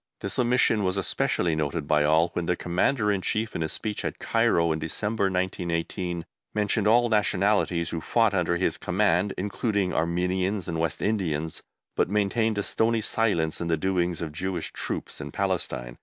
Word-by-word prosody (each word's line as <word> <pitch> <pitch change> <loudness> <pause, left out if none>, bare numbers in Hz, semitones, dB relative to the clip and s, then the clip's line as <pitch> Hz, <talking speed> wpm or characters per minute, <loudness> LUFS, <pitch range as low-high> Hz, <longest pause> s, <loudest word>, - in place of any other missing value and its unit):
This 100 - -3
omission 120 -3 +3
was 95 +1 0
especially 90 -3 0
noted 75 0 -2
by 75 -1 +3
all 80 +3 +4
when 85 -1 -2
the 90 - +2
Commander 105 +6 +1
in 100 -2 0
Chief 110 +3 -1
in - - -2
his 80 - -1
speech 105 -2 -3
at - - -3
Cairo, 85 -1 +2
in 80 - -1
December, 105 +7 -1
1918, 90 -1 -2 0.3
mentioned 105 0 +1
all 120 +2 +5
nationalities 100 -5 +1
who 85 - -3
fought 115 +2 +2
under 85 -2 +1
his 95 - 0
command, 95 0 +1
including 100 0 -1
Armenians 90 +3 0
and 85 -2 -2
West 80 -2 -1
Indians, 80 -7 -1 0.3
but - - +1
maintained 105 +2 +1
a 100 - 0
stony 115 +2 +1
silence 100 -9 0
on 85 - -2
the 80 -1 +1
doings 90 -1 0
of 80 - -4
Jewish 90 +2 -3
Troops - - -5
in 70 -1 -6
Palestine. 85 -11 -2
90 Hz, 170 wpm, -26 LUFS, 85-105 Hz, 0.3 s, all